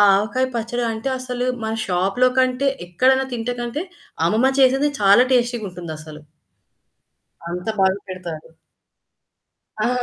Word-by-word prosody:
ఆవకాయ 225 +6 0
పచ్చడి 235 +1 -2
అంటే 225 +4 -3
అసలు 250 -1 -3 0.2
మన 220 0 -2
షాప్‌లో 195 +8 +2
కంటే 255 +2 +2 0.2
ఎక్కడైనా 265 +8 +3
తింటేకంటే 240 +5 -3 0.4
అమ్మమ్మ 235 +7 +3
చేసేదే 270 +3 +4
చాలా 200 +5 +6
టేస్టీగుంటుందసలు. 175 -11 -3 1.3
అంత 180 +3 -5
బాగా 190 0 +3
పెడతారు. 170 -4 -7 1.3
అ! 215 - +1
230 Hz, 100 wpm, -21 LUFS, 185-255 Hz, 1.3 s, చాలా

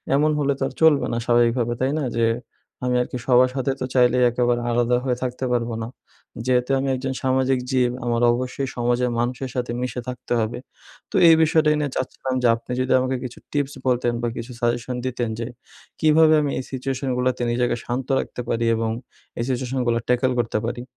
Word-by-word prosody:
এমন 150 +2 +3
হলে 140 -1 +2
তো - - -1
আর 135 - -8
চলবে 160 -3 +5
না - - 0
স্বাভাবিকভাবে, 120 0 +2
তাই 130 +1 +2
না? - - -2
যে 115 -1 +3 0.6
আমি 125 0 +1
আর 125 - -2
কি - - -3
সবার 125 0 +5
সাথে 135 0 0
তো 130 - -2
চাইলেই 125 0 +4
একেবারে 120 0 +1
আলাদা 120 +1 +2
হয়ে 125 -2 0
থাকতে 125 +1 -3
পারবো 120 -1 0
না, 110 - -4 0.6
যেহেতু 125 0 +1
আমি 135 - -1
একজন 130 +1 -3
সামাজিক 130 0 +2
জীব, 125 -2 +2
আমার 120 -1 0
অবশ্যই 130 +2 -3
সমাজের 120 +1 +1
মানুষের 125 +2 -2
সাথে 125 -2 -2
মিশে 125 -1 -3
থাকতে 125 -1 -4
হবে। 110 +2 -3 0.5
তো - - -6
এই 165 - +8
বিষয়টাই 155 -1 +3
নিয়ে 145 -2 -1
চাচ্ছিলাম 130 0 -3
যে - - +5
আপনি 115 +2 -10
যদি 130 - -1
আমাকে 130 0 -1
কিছু 125 -1 -7
টিপস 145 -1 -1
বলতেন 120 -1 +1
বা - - +1
কিছু 115 +2 -6
সাজেশন 120 +1 -1
দিতেন 120 -2 -2
যে 115 - -3 0.5
কীভাবে 155 0 +5
আমি 145 -2 -1
এই - - -4
সিচুয়েশানগুলাতে 130 -1 -1
নিজেকে 120 0 +1
শান্ত 125 +1 -3
রাখতে - - -5
পারি 115 0 0
এবং 115 0 -1 0.5
এই - - 0
সিচুয়েশানগুলা 125 -2 0
ট্যাকেল 125 +1 +2
করতে 115 -2 0
পারি? 120 +1 -4
125 Hz, 190 wpm, -23 LUFS, 120-130 Hz, 0.6 s, এই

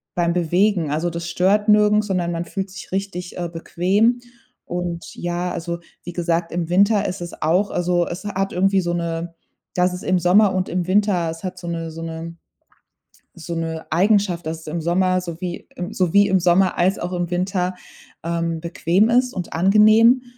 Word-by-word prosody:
beim 170 -1 +1
Bewegen, 175 -1 +1
also 165 +3 0
das 170 0 -5
stört 205 +5 +2
nirgends, 210 0 +4
sondern 175 -3 -1
man 170 +1 -2
fühlt 195 +2 -5
sich 195 - -10
richtig, 185 -2 -4
äh, 175 -1 -2
bequem. 190 +8 +1 0.5
Und, 175 -1 -5
ja, 175 +1 -3
also 170 0 -4 0.2
wie 175 - -6
gesagt, 170 -1 -1
im 170 -1 -2
Winter 200 +3 +3
ist 185 0 -5
es 175 - -8
auch 180 +6 +2
also, 175 0 +1
es 180 +4 -7
hat 195 -1 -2
irgendwie 195 +1 +2
so 175 0 -2
'ne 170 0 -3 0.4
dass 180 0 +2
es 180 - -7
im 185 -1 +2
Sommer 190 +3 +4
und 185 -1 -1
im 180 0 -2
Winter 190 -4 +2
es 165 +2 -7
hat 185 0 -5
so 175 - -8
'ne 165 -1 -3
so 165 +1 -8
'ne 165 0 -6 1.0
so 170 0 -6
'ne 165 -1 -4
Eigenschaft, 185 -1 +2
dass 160 0 -4
es - - -15
im 165 +2 -3
Sommer 185 +2 +1
so 170 -1 -7
wie 180 -2 -5 0.2
so 180 -3 0
wie 200 0 +6
im 190 -1 +3
Sommer 180 +2 +3
als 185 +3 +2
auch 180 +1 -4
im 175 -1 -2
Winter, 180 0 -1 0.5
ähm, 165 -1 -2
bequem 175 +5 +1
ist 250 +1 +2
und 180 -2 -5
angenehm 215 +7 +5
180 Hz, 190 wpm, -21 LUFS, 170-195 Hz, 1.0 s, wie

